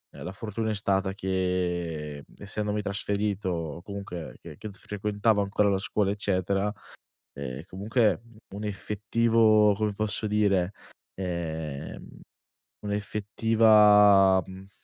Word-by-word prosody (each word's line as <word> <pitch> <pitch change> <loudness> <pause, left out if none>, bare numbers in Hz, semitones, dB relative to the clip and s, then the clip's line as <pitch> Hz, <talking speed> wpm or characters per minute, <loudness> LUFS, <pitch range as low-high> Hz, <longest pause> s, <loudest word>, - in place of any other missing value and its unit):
la 90 - -7
fortuna 110 +1 -3
è - - 0
stata 95 -1 0
che, 90 -6 -2
essendomi 105 +1 -3
trasferito, 100 -1 -2
o 85 -2 -4
comunque 100 -4 -7
che 80 -3 -11
che 110 - -7
s 100 - -14
frequentavo 105 +1 0
ancora 100 +1 +1
la 95 - +2
scuola 100 0 0
eccetera, 100 0 0 0.6
eh, 70 +2 -6
comunque 105 +4 +1 0.3
un 105 - -6
effettivo, 105 +1 +2
come 105 0 -1
posso 110 +1 -2
dire, 100 -3 +1 0.4
ehm, 80 -6 -5 0.6
un'effettiva, 105 -1 +4
uhm 95 +1 -11
100 Hz, 110 wpm, -27 LUFS, 95-105 Hz, 0.6 s, un'effettiva